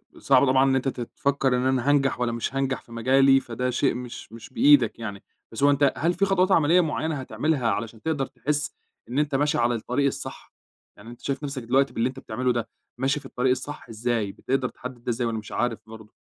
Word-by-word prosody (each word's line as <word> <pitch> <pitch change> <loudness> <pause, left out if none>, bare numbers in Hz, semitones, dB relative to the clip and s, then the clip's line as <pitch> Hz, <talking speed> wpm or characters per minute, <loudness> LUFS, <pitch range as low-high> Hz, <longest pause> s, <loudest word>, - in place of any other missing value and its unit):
آآ، - - -14
صعب 135 0 +4
طبعًا 130 0 +4
إن 135 - +2
أنت 130 +1 0
ت 125 -2 -3
تفكر 135 +1 0
إن 125 - -1
أنا 130 +1 +1
هانجح 135 -3 +2
والّا 120 -1 0
مش 115 +3 -3
هانجح 135 -1 -1
في 115 - -21
مجالي، 135 +3 +4
فده 125 0 -3
شيء 130 +1 +1
مش 125 -3 -8
مش 115 +2 -11
بإيدك 135 -6 +5
يعني، 100 -3 -6 0.3
بس 115 +5 -4
هو 145 - +6
أنت 140 -1 +3
هل 170 +3 +1
في 195 +3 +1
خطوات 190 0 +2
عملية 170 +2 +5
معينة 160 -1 -2
هتعملها، 140 -1 -1
علشان 110 +2 -3
تقدر 155 -4 -1
تحس 150 +2 -2 0.4
إن 130 +4 -1
أنت 145 -2 0
ماشي 150 +2 +1
على 120 0 +2
الطريق 125 +5 -1
الصح؟ 140 - -4 0.4
يعني 105 +3 -12
أنت 120 - -12
شايف 140 +1 -3
نفسك 135 -3 -4
دلوقتي، 135 +4 +2
باللي 115 +3 0
أنت 135 +1 -9
بتعمله 125 +2 -1
ده، 120 -2 -3 0.3
ماشي 135 +3 0
في - - -17
الطريق 125 +1 0
الصح، 135 +2 -4
إزاي 115 -2 -1
بتقدر 130 +4 -2
تحدد، 125 -1 -10
إزاي، 120 0 0
والّا 110 -1 -2
مش 105 - -11
عارف 120 -2 -1
برضه؟ 110 -1 -12
130 Hz, 220 wpm, -25 LUFS, 120-140 Hz, 0.4 s, هو